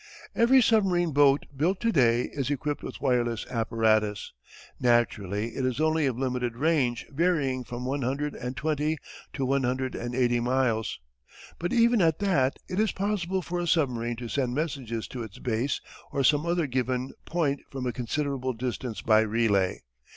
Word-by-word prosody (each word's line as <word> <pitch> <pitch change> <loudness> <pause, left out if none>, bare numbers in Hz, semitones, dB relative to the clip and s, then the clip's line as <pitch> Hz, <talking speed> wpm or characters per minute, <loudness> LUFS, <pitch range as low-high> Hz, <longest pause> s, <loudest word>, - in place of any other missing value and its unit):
Every 250 +2 +5
submarine 185 -7 +3
boat 140 0 +4
built 175 +7 +1
to 230 -1 +2
day 120 - +3
is 140 -3 -2
equipped 145 +1 -2
with - - -7
wireless 120 -4 +1
apparatus. 110 -3 +1 0.5
Naturally 115 -3 +1
it 135 - -2
is 130 +1 -1
only 155 -1 +2
of 125 -3 -2
limited 125 -2 -1
range 135 -5 +1
varying 140 -5 +1
from 120 +1 -6
one 140 +2 -1
hundred 140 +4 -1
and 125 +1 -6
twenty 155 +1 0 0.4
to 135 - -2
one 135 +1 +1
hundred 130 +1 -1
and 120 0 -4
eighty 120 -2 +2
miles, 120 - 0 0.6
but 175 +1 -2
even 235 -2 +4
at 160 -2 +3
that 155 -10 +1
it 185 +1 -3
is 215 -1 +2
possible 190 -2 -1
for 175 +1 -3
a 175 - -2
submarine 120 -8 +1
to 120 +1 -6
send 125 0 -1
messages 135 -7 -3
to 125 - -6
its 110 -4 -8
base 125 +3 -1 0.3
or 140 - 0
some 150 +5 +3
other 170 -1 +1
given 130 -1 -2
point 150 -5 0
from 135 -2 -5
a 125 - -1
considerable 130 +1 -2
distance 120 -1 -4
by 110 -1 +5
relay. 110 -4 +1
130 Hz, 170 wpm, -27 LUFS, 120-155 Hz, 0.6 s, Every